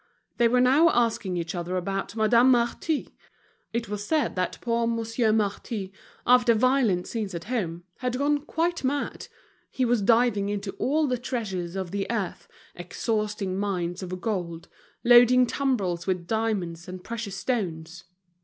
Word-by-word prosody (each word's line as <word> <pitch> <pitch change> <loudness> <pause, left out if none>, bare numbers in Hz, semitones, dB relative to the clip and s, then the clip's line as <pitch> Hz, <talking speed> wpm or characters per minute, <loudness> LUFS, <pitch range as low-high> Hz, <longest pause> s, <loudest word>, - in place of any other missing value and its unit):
They 240 -1 +4
were 250 +2 +3
now 280 +7 +5
asking 225 - 0
each 170 +2 -3
other 180 +1 -3
about 195 +3 -3
Madame 230 +3 +4
Marty; 250 +5 0 0.6
it 235 0 -2
was 205 0 -4
said 310 +6 0
that 185 -1 -2
poor 235 -1 0
Monsieur 230 0 0
Marty, 205 -1 -2 0.3
after 245 -2 +5
violent 235 -6 +2
scenes 210 -5 -4
at 170 - -5
home, 185 -8 -3
had 250 -1 -2
gone 290 +2 +2
quite 330 +3 -2
mad; 280 +2 -2 0.4
he 260 - 0
was 240 -2 +2
diving 225 -2 +3
into 200 -1 -3
all 305 +4 +2
the 250 -3 -1
treasures 195 -9 -4
of 190 -3 -4
the 200 -1 -3
earth, 215 -6 -3 0.3
exhausting 205 +1 -2
mines 180 -3 -2
of 185 0 -5
gold, 175 -6 -4 0.3
loading 245 +1 +7
tumbrels 200 -12 -1
with 185 -2 -1
diamonds 190 -6 -2
and 185 0 -8
precious 225 -4 -5
stones. 175 -7 -3
220 Hz, 150 wpm, -26 LUFS, 185-245 Hz, 0.6 s, loading